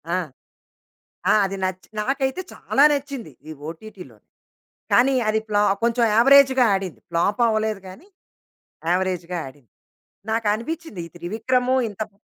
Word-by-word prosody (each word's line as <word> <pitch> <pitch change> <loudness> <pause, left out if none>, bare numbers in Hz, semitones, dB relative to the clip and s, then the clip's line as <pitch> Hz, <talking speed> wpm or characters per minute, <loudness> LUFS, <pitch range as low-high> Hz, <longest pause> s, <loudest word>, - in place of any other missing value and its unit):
ఆ! - - +1 1.1
ఆ! - - +6
అది 195 0 -3
నచ్చి 185 0 -4
నాకైతే 270 +6 -1
చాలా 280 - +2
నచ్చింది 280 -3 -4 0.2
ఈ - - -6 0.2
ఓటీటీలోని. 170 - -11 0.7
కానీ 265 +2 +5
అది 220 0 +2
ప్లా 205 -1 +2 0.2
కొంచెం 235 0 +2
యావరేజ్‌గా 265 +1 +6
ఆడింది 185 -12 -4
ఫ్లాప్ 200 +7 0
అవ్వలేదు 215 -2 -1
గానీ, 245 - -13 0.8
యావరేజ్‌గా 180 -1 -1
ఆడింది. 130 -5 -16 0.6
నాకనిపిచ్చింది 225 - -2
ఈ - - -21
త్రివిక్రము 245 +8 0
ఇంత 205 +1 -10
బా 200 - -33
215 Hz, 120 wpm, -22 LUFS, 185-260 Hz, 1.1 s, ఆ